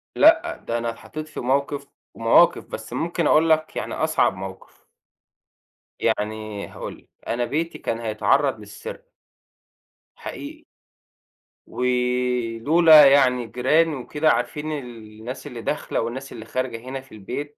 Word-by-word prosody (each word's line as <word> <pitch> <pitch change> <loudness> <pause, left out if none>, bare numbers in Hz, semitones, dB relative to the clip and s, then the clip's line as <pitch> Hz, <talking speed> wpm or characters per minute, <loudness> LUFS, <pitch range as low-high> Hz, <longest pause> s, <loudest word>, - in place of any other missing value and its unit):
لأ، - - +5
ده 115 - 0
أنا 115 0 -2
اتحطّيت 155 +6 -7
في 155 - -8
موقف 140 +2 -1 0.3
ومواقف - - +4
بس - - -8
ممكن 170 -1 -1
أقول 160 +1 +4
لك 155 0 +2
يعني - - -4
أصعب 155 -10 +1
موقف. 95 0 -10 1.1
يعني 105 -1 -2
هاقول - - -8
لك - - -24 0.2
أنا 120 +1 0
بيتي 165 +5 -2
كان 115 - -3
هيتعرّض 115 +3 +1
للسرقة. 105 -1 -10 1.0
حقيقي. - - -8 1.0
ولولا 125 +5 +4
يعني 130 -3 +4
الجيران 150 +8 +2
وكده 150 +4 0
عارفين 150 +6 -2
ال 145 -4 -4 0.3
الناس 125 +4 -7
اللي 120 -1 -7
داخلة 150 - -2
والناس 130 +4 -5
اللي 115 -1 -9
خارجة 130 -1 -3
هِنا 135 0 -5
في 135 - -22
البيت 140 +8 -6
125 Hz, 130 wpm, -23 LUFS, 115-150 Hz, 1.1 s, لأ